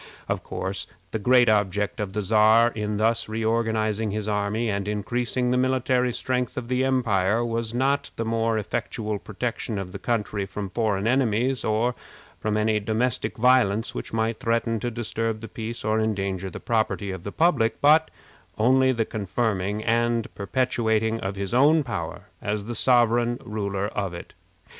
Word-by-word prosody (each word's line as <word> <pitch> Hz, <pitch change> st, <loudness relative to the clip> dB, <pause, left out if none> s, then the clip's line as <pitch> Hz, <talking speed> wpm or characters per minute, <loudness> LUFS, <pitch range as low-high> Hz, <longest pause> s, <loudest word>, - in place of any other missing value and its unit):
Of -, -, -1 dB
course, 95 Hz, +1 st, -4 dB, 0.2 s
the 110 Hz, -, -2 dB
great 125 Hz, +3 st, +5 dB
object 105 Hz, 0 st, +1 dB
of 100 Hz, -3 st, -3 dB
the 105 Hz, 0 st, -1 dB
Czar 110 Hz, +3 st, +5 dB
in 105 Hz, -2 st, -3 dB
thus 115 Hz, +1 st, +1 dB
reorganizing 110 Hz, -1 st, 0 dB
his 105 Hz, +1 st, -3 dB
army 105 Hz, +2 st, 0 dB
and 100 Hz, -1 st, -2 dB
increasing 120 Hz, +4 st, -1 dB
the 125 Hz, -, +2 dB
military 130 Hz, -1 st, +1 dB
strength 125 Hz, 0 st, -2 dB
of 120 Hz, -2 st, -4 dB
the 130 Hz, 0 st, +1 dB
empire 115 Hz, -4 st, +1 dB
was 115 Hz, -1 st, -2 dB
not 135 Hz, +3 st, +1 dB
the 115 Hz, -, -3 dB
more 115 Hz, 0 st, 0 dB
effectual 105 Hz, 0 st, -3 dB
protection 110 Hz, +1 st, -4 dB
of 95 Hz, -2 st, -5 dB
the 100 Hz, -, -7 dB
country 105 Hz, -4 st, -1 dB
from 100 Hz, -1 st, -5 dB
foreign 105 Hz, -3 st, 0 dB
enemies, 125 Hz, 0 st, +1 dB
or 110 Hz, +3 st, +1 dB, 0.5 s
from 105 Hz, 0 st, -1 dB
any 110 Hz, 0 st, +2 dB
domestic 110 Hz, +2 st, -1 dB
violence 115 Hz, -3 st, +3 dB
which -, -, -6 dB
might 110 Hz, 0 st, -1 dB
threaten 115 Hz, 0 st, 0 dB
to 120 Hz, -, -2 dB
disturb 115 Hz, -1 st, -2 dB
the 115 Hz, -, -8 dB
peace 115 Hz, 0 st, -6 dB
or 110 Hz, 0 st, +2 dB
endanger 100 Hz, -3 st, -1 dB
the -, -, -8 dB
property 110 Hz, -3 st, -1 dB
of 95 Hz, -2 st, -7 dB
the 100 Hz, -, -5 dB
public, 160 Hz, -, +2 dB
but 155 Hz, +2 st, +5 dB, 0.5 s
only 130 Hz, +4 st, +4 dB
the 115 Hz, -3 st, 0 dB
confirming 105 Hz, -1 st, -2 dB
and 115 Hz, 0 st, +1 dB
perpetuating 110 Hz, +1 st, 0 dB, 0.2 s
his 100 Hz, +2 st, -4 dB
own 150 Hz, +5 st, +5 dB
power 95 Hz, -11 st, -4 dB, 0.2 s
as 105 Hz, 0 st, -2 dB
the 120 Hz, -, -4 dB
sovereign 120 Hz, 0 st, +3 dB
ruler 100 Hz, -2 st, -2 dB
of 95 Hz, -4 st, -3 dB
it. 85 Hz, -, -10 dB
110 Hz, 160 wpm, -25 LUFS, 105-120 Hz, 0.5 s, great